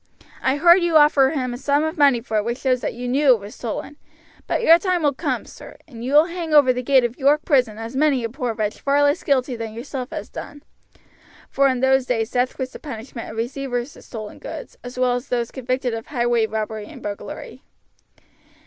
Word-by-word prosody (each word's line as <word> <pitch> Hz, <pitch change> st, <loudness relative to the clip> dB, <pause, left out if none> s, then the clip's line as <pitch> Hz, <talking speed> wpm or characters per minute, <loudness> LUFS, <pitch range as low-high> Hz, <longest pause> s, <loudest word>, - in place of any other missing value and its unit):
I 265 Hz, +1 st, +1 dB
heard 345 Hz, +4 st, +6 dB
you 340 Hz, -2 st, +4 dB
offer 295 Hz, -3 st, +5 dB
him 255 Hz, -5 st, -2 dB
a 245 Hz, -, -7 dB
sum 285 Hz, +2 st, +1 dB
of 315 Hz, +2 st, -2 dB
money 280 Hz, -6 st, +4 dB
for 220 Hz, -2 st, -2 dB
it 210 Hz, -, +1 dB
which 235 Hz, +2 st, -2 dB
shows 255 Hz, -2 st, 0 dB
that -, -, -3 dB
you 245 Hz, +1 st, -5 dB
knew 265 Hz, +1 st, +4 dB
it -, -, -7 dB
was 205 Hz, +1 st, -10 dB
stolen; 250 Hz, +5 st, -6 dB, 0.5 s
but -, -, -1 dB
your 335 Hz, -3 st, +7 dB
time 365 Hz, -3 st, 0 dB
will 290 Hz, -1 st, +3 dB
come, -, -, -2 dB
sir, -, -, -13 dB
and 235 Hz, -6 st, -10 dB
you 260 Hz, +3 st, -3 dB
will 300 Hz, +2 st, +7 dB
hang 335 Hz, -3 st, -3 dB
over 270 Hz, -4 st, +6 dB
the 250 Hz, -, -3 dB
gate 260 Hz, 0 st, +4 dB
of 240 Hz, +3 st, -3 dB
York 290 Hz, +2 st, +3 dB
prison 250 Hz, -8 st, +2 dB
as 225 Hz, +3 st, -7 dB
many 275 Hz, -3 st, +2 dB
a 230 Hz, -, -2 dB
poor 245 Hz, -2 st, -3 dB
wretch 215 Hz, -1 st, -3 dB
far 285 Hz, +1 st, +2 dB
less 290 Hz, +3 st, +2 dB
guilty 260 Hz, -3 st, +1 dB
than 225 Hz, -1 st, -6 dB
yourself 255 Hz, +1 st, -6 dB
has -, -, -6 dB
done;" 290 Hz, 0 st, -9 dB, 0.9 s
for 275 Hz, 0 st, +3 dB
in 255 Hz, -2 st, 0 dB
those 265 Hz, -1 st, +3 dB
days 225 Hz, -2 st, -1 dB
death 250 Hz, +1 st, 0 dB
was 260 Hz, -1 st, -4 dB
the -, -, -10 dB
punishment 235 Hz, -3 st, -8 dB
of 225 Hz, -, -9 dB
receivers 245 Hz, +2 st, -3 dB
of -, -, -15 dB
stolen 215 Hz, -3 st, -8 dB
goods, -, -, -8 dB
as 245 Hz, 0 st, -9 dB
well 255 Hz, -1 st, +2 dB
as 245 Hz, +1 st, -3 dB
of 245 Hz, -, +2 dB
these 235 Hz, -1 st, -3 dB
convicted 255 Hz, -1 st, -2 dB
of 225 Hz, 0 st, -6 dB
highway 240 Hz, -4 st, +1 dB
robbery 215 Hz, -1 st, -4 dB
and -, -, -12 dB
burglary. 205 Hz, -1 st, -7 dB
255 Hz, 230 wpm, -22 LUFS, 235-285 Hz, 0.9 s, your